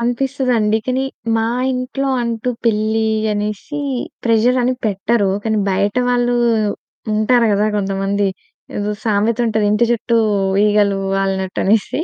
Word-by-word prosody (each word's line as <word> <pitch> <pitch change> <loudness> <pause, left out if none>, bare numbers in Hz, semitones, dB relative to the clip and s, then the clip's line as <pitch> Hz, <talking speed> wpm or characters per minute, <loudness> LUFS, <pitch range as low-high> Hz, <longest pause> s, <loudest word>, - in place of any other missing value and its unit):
అనిపిస్తదండి. 245 -3 0
కానీ, 260 +1 0 0.3
మా 225 - +1 0.3
ఇంట్లో 255 +2 -2
అంటూ 235 0 -3 0.2
పెళ్లి 220 0 +1 0.3
అనేసి 210 +8 -3 0.4
ప్రెషరని 245 +2 +2
పెట్టరు. 200 +1 +1
కానీ, 220 -1 +1
బయట 200 +4 0
వాళ్ళు 245 0 +1 0.8
ఉంటారు 230 +2 +3
కదా 205 +1 +2
కొంతమంది. 195 0 0 0.5
ఏదో 205 0 -2
సామెతుంటది 220 0 +1
ఇంటి 210 +3 +3
చుట్టూ 235 0 +1 0.5
ఈగలు 205 -1 +2 0.2
వాలినట్టనేసి. 195 +5 0
220 Hz, 105 wpm, -18 LUFS, 205-240 Hz, 0.8 s, ఉంటారు